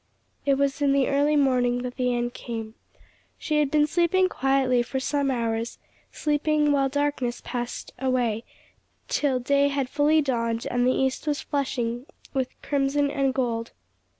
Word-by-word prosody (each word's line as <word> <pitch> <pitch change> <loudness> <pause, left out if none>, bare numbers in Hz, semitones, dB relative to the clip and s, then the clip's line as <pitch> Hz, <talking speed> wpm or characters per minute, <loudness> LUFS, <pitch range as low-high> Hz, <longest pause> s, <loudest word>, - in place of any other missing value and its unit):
It 275 - +5
was 280 +1 0
in 280 -1 +3
the 275 -2 +3
early 285 +2 +2
morning 250 -3 +2
that 250 0 -5
the 250 -1 0
end 240 0 -1
came. 225 -3 -6 0.6
She 305 -2 0
had 295 -2 +2
been 300 0 +3
sleeping 350 +4 +2
quietly 270 -4 +2
for 265 +2 -3
some 280 +1 0
hours, 230 -2 -2 0.3
sleeping 300 0 +1
while 275 -1 +2
darkness 285 -4 -1
passed 240 -1 -5
away 245 -4 0 0.6
till 270 -4 +1
day 280 +3 +2
had 275 -2 -1
fully 295 +3 +3
dawned 230 -5 -1
and 245 0 +2
the - - +4
east 265 +3 -1
was 295 -1 0
flushing 250 -3 -2 0.3
with 260 -2 -2
crimson 280 0 +1
and 275 -1 +1
gold. 235 -3 -2
270 Hz, 155 wpm, -25 LUFS, 245-285 Hz, 0.6 s, It